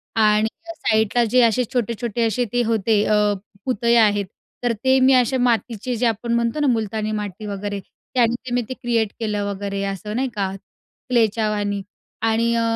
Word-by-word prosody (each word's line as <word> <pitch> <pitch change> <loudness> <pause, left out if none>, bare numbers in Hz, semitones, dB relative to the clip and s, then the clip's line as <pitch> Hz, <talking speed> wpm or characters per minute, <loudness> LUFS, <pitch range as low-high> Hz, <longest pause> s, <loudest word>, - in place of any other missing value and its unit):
आणि 215 -1 +4 0.3
साईडला 220 0 +2
जे 255 - +5
असे 235 +2 +3
छोटे-छोटे 235 -1 -1
असे 235 +3 0
ते 245 - +2
होते 220 -2 +2
अ, 215 - +3 0.5
पुतळे 235 -2 +2
आहेत, 205 -3 +4 0.4
तर 245 - +2
ते 265 0 +4
मी 260 +1 +5
अशा 255 0 +3
मातीचे, 240 -1 0
जे 240 +2 0
आपण 230 +1 0
म्हणतो 235 +4 0
ना, 295 - +2
मुलतानी 220 -3 0
माती 210 -1 -4
वगैरे, 205 0 -4 0.3
त्याने 240 -2 +3
ते 245 - -4
मी 245 - +2
क्रिएट 235 -4 -1
केलं, 210 -2 -1
वगैरे 200 0 -3
असं 200 +2 -4
नाही 260 +2 0
का? 195 -2 -1 0.6
क्लेच्या 220 -3 +2
वाणी 205 -1 -1 0.4
आणि 225 +1 +2
अ, 230 - +2
225 Hz, 170 wpm, -21 LUFS, 210-240 Hz, 0.6 s, जे